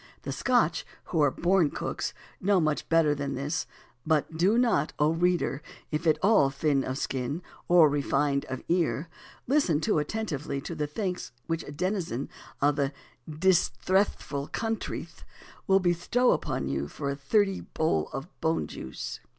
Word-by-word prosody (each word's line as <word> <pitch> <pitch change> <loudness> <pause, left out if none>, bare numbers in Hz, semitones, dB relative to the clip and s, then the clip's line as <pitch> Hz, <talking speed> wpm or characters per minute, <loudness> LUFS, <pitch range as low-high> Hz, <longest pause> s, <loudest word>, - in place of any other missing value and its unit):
The - - -4
Scotch, 240 -10 +2 0.2
who 165 - 0
are 145 - +5
born 175 +2 +2
cooks, - - -3 0.3
know 195 0 +3
much 155 -3 0
better 165 -3 +4
than 140 -1 -3
this; 140 +3 -2 0.4
but 155 0 +1
do 190 +8 +3
not, 240 -10 +2
O 150 +1 +3
reader, 170 -4 +1 0.3
if 155 +2 -1
at 155 - +4
all 200 -9 +5
thin 135 0 +1
of 130 +1 -3
skin, 135 +5 -3 0.2
or 175 -3 +7
refined 140 -1 +1
of 130 -1 -6
ear, 170 -2 +1 0.4
listen 250 - +2
too 155 0 +1
attentively 150 -5 -3
to - - -6
the 150 - -2
thanks 180 +3 -3
which 165 0 -2
a - - -8
denizen 170 - -2 0.3
of 145 0 +3
the 140 -1 0 0.4
"disthressful 175 -2 +1
counthry" 225 -1 -3 0.6
will 195 0 +5
bestow 180 +8 +2
upon 70 - -1
you 70 +1 -2
for 140 - -4
a - - -3
"dhirty 195 +8 +1
bowl 120 - +1
o' 135 - -4 0.2
bone 160 +1 +1
juice." 65 - -6
155 Hz, 155 wpm, -28 LUFS, 140-185 Hz, 0.6 s, or